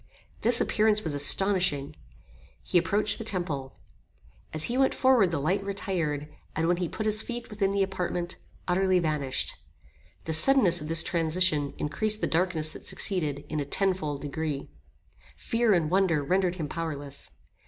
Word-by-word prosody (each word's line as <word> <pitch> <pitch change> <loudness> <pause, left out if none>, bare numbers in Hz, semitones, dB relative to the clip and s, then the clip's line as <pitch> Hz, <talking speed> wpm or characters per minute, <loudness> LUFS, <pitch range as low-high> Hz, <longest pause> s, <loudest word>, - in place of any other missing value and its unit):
This 235 +1 +4
appearance 215 0 +2
was 160 - -2
astonishing. 145 -1 +3 0.7
He 175 - +2
approached 205 +5 +1
the - - -4
temple. 145 -8 -3 0.7
As 155 -1 +1
he 240 - 0
went 265 +1 +2
forward 255 -8 +4
the 165 - -2
light 180 +8 0
retired, 175 -7 -2 0.3
and, 165 +1 0
when 175 0 +2
he 175 -2 -2
put 215 - -5
his 215 0 +3
feet 240 -1 -7
within 200 -2 0
the 200 0 +1
apartment, 180 -2 -3 0.3
utterly 185 +1 +2
vanished. 150 -6 -2 0.7
The 160 - -3
suddenness 180 - +6
of 150 - -6
this 165 0 +2
transition 160 -3 0
increased 215 +8 -1
the - - 0
darkness 160 -2 0
that - - -11
succeeded 155 -8 -1
in 155 - -3
a - - -1
tenfold 155 -4 -1
degree. 145 - -4 0.7
Fear 230 -2 +1
and 160 -2 0
wonder 180 -6 +2
rendered 180 +3 +1
him 160 -5 -4
powerless. 145 -4 -5
175 Hz, 155 wpm, -27 LUFS, 155-195 Hz, 0.7 s, suddenness